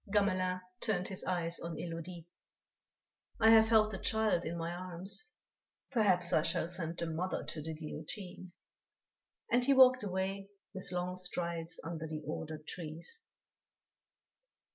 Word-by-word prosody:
Gamelin 185 Hz, -3 st, +2 dB, 0.2 s
turned 190 Hz, -4 st, 0 dB
his 190 Hz, -, -4 dB
eyes 170 Hz, -2 st, 0 dB
on 170 Hz, -1 st, -5 dB
Élodie: 165 Hz, +1 st, -6 dB, 1.1 s
"I 220 Hz, 0 st, +7 dB
have 220 Hz, 0 st, +8 dB
held 220 Hz, -1 st, +5 dB
the 195 Hz, -, -4 dB
child 220 Hz, -6 st, +2 dB
in 170 Hz, +2 st, -3 dB
my 165 Hz, 0 st, -2 dB
arms; 185 Hz, +6 st, -4 dB, 0.6 s
perhaps 190 Hz, -8 st, +3 dB
I -, -, +5 dB
shall 170 Hz, +1 st, 0 dB
send 170 Hz, -2 st, -2 dB
the 170 Hz, -, -1 dB
mother 165 Hz, +3 st, -2 dB
to 155 Hz, -, -3 dB
the 160 Hz, +1 st, -5 dB
guillotine," 175 Hz, +4 st, -6 dB, 1.0 s
and 245 Hz, +1 st, +4 dB
he 275 Hz, +2 st, +5 dB
walked 255 Hz, -2 st, +8 dB
away 195 Hz, 0 st, -2 dB, 0.2 s
with 190 Hz, -1 st, -6 dB
long 180 Hz, 0 st, -2 dB
strides 170 Hz, -2 st, -2 dB
under 165 Hz, -1 st, -4 dB
the 155 Hz, -1 st, -5 dB
ordered 155 Hz, 0 st, -5 dB
trees. 170 Hz, -, -5 dB
180 Hz, 140 wpm, -34 LUFS, 165-200 Hz, 1.1 s, have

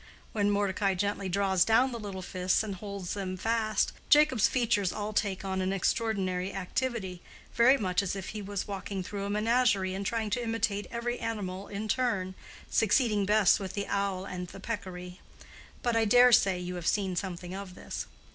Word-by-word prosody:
When 205 Hz, -2 st, +1 dB
Mordecai 200 Hz, -1 st, +1 dB
gently 200 Hz, 0 st, -1 dB
draws 190 Hz, -1 st, +3 dB
down 245 Hz, +4 st, +3 dB
the 235 Hz, -, -5 dB
little 195 Hz, -3 st, -6 dB
fists 185 Hz, +2 st, +1 dB
and 210 Hz, -2 st, -4 dB
holds 200 Hz, -1 st, -5 dB
them 185 Hz, -2 st, -4 dB
fast, 220 Hz, 0 st, 0 dB, 0.2 s
Jacob's 295 Hz, -7 st, +5 dB
features 220 Hz, -7 st, +1 dB
all 210 Hz, 0 st, -4 dB
take 200 Hz, -2 st, -1 dB
on 190 Hz, -1 st, -1 dB
an 185 Hz, 0 st, 0 dB
extraordinary 195 Hz, -2 st, 0 dB
activity, 195 Hz, -2 st, -3 dB, 0.3 s
very 250 Hz, +4 st, +6 dB
much 185 Hz, -5 st, 0 dB
as 195 Hz, -1 st, -2 dB
if 195 Hz, -1 st, -5 dB
he 215 Hz, -, -5 dB
was 200 Hz, -1 st, -4 dB
walking 195 Hz, -1 st, -4 dB
through 200 Hz, +1 st, -5 dB
a -, -, -3 dB
menagerie 210 Hz, -3 st, +2 dB
and 195 Hz, +1 st, -3 dB
trying 220 Hz, 0 st, -2 dB
to 245 Hz, -, 0 dB
imitate 225 Hz, -3 st, -1 dB
every 240 Hz, +1 st, -3 dB
animal 200 Hz, -4 st, -4 dB
in 210 Hz, +1 st, -5 dB
turn, 210 Hz, -6 st, 0 dB, 0.3 s
succeeding 215 Hz, -2 st, +2 dB
best 210 Hz, -2 st, +5 dB
with 190 Hz, -2 st, -5 dB
the 200 Hz, -1 st, -2 dB
owl 200 Hz, -2 st, -1 dB
and 180 Hz, -2 st, -5 dB
the 195 Hz, -, -11 dB
peccary. 185 Hz, -4 st, -6 dB, 0.6 s
But 240 Hz, -1 st, +1 dB
I 225 Hz, -1 st, +3 dB
dare 245 Hz, +3 st, +7 dB
say 195 Hz, -5 st, +5 dB
you 180 Hz, 0 st, -5 dB
have 165 Hz, -, -4 dB
seen 195 Hz, -3 st, +1 dB
something 180 Hz, 0 st, -4 dB
of 190 Hz, -1 st, -7 dB
this. -, -, -6 dB
200 Hz, 185 wpm, -29 LUFS, 190-220 Hz, 0.6 s, dare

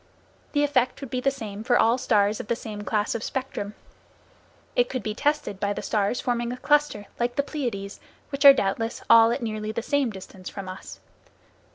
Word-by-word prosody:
The 290 Hz, -1 st, +3 dB
effect 260 Hz, -4 st, +1 dB
would 275 Hz, -5 st, -8 dB
be 255 Hz, -, -1 dB
the 275 Hz, -, +3 dB
same 220 Hz, -6 st, -6 dB
for 245 Hz, +1 st, +3 dB
all 230 Hz, +3 st, +3 dB
stars 210 Hz, -4 st, +2 dB
of -, -, -6 dB
the 235 Hz, -, +1 dB
same 215 Hz, -3 st, -7 dB
class 210 Hz, 0 st, 0 dB
of 230 Hz, -, -3 dB
spectrum. 255 Hz, -6 st, -4 dB, 1.0 s
It 245 Hz, 0 st, +3 dB
could 255 Hz, -, -3 dB
be 215 Hz, -, -2 dB
tested 290 Hz, -6 st, -1 dB
by 205 Hz, 0 st, 0 dB
the -, -, -6 dB
stars 210 Hz, +2 st, 0 dB
forming 240 Hz, -1 st, -1 dB
a 250 Hz, -, -5 dB
cluster, 290 Hz, -6 st, +1 dB
like 240 Hz, 0 st, 0 dB
the 280 Hz, -, +1 dB
Pleiades, 235 Hz, -10 st, -4 dB, 0.3 s
which 275 Hz, -1 st, -2 dB
are 280 Hz, -, +12 dB
doubtless 225 Hz, -2 st, -1 dB
all 230 Hz, 0 st, +8 dB
at 240 Hz, -, -2 dB
nearly 215 Hz, -1 st, -3 dB
the 225 Hz, +1 st, -3 dB
same 285 Hz, -2 st, +1 dB
distance 190 Hz, -2 st, -9 dB
from 195 Hz, -2 st, -7 dB
us. 185 Hz, 0 st, -9 dB
230 Hz, 200 wpm, -25 LUFS, 210-265 Hz, 1.0 s, are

